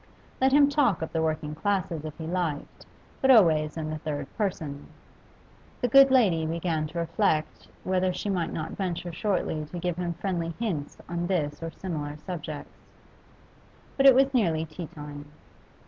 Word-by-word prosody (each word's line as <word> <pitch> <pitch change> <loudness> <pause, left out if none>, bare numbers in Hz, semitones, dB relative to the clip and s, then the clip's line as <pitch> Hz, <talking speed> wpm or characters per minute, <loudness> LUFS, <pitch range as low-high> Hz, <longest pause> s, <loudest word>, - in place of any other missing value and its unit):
Let 265 0 +4
him 285 +1 +6
talk 280 - +2
of 160 - -6
the 160 - +1
working 155 -1 -1
classes 170 -2 -1
if 155 - -7
he 160 - -6
liked, 165 -4 -3 0.3
but 265 - +3
always 160 - +5
in 155 -1 -3
the 155 - -4
third 145 -2 -3
person. 160 -9 -3 0.9
The 245 - +1
good 275 +3 +8
lady 205 -12 +4
began 160 -1 -1
to 160 - -9
reflect 165 -2 0 0.2
whether 185 0 +1
she 180 - -5
might 180 -5 -1
not 160 0 -4
venture 175 -2 -3
shortly 175 -4 -1
to 155 +4 -8
give 175 0 -2
him 175 -1 -2
friendly 170 -2 -2
hints 180 -11 -3
on 175 0 -2
this 155 -6 -1
and 165 0 -4
similar 150 -5 -4
subjects. 155 -3 -7 1.2
But 275 0 +5
it 265 - +9
was 270 +1 +4
nearly 165 -10 +2
tea 160 +2 -7
time. 145 -1 -10
170 Hz, 165 wpm, -27 LUFS, 155-190 Hz, 1.2 s, it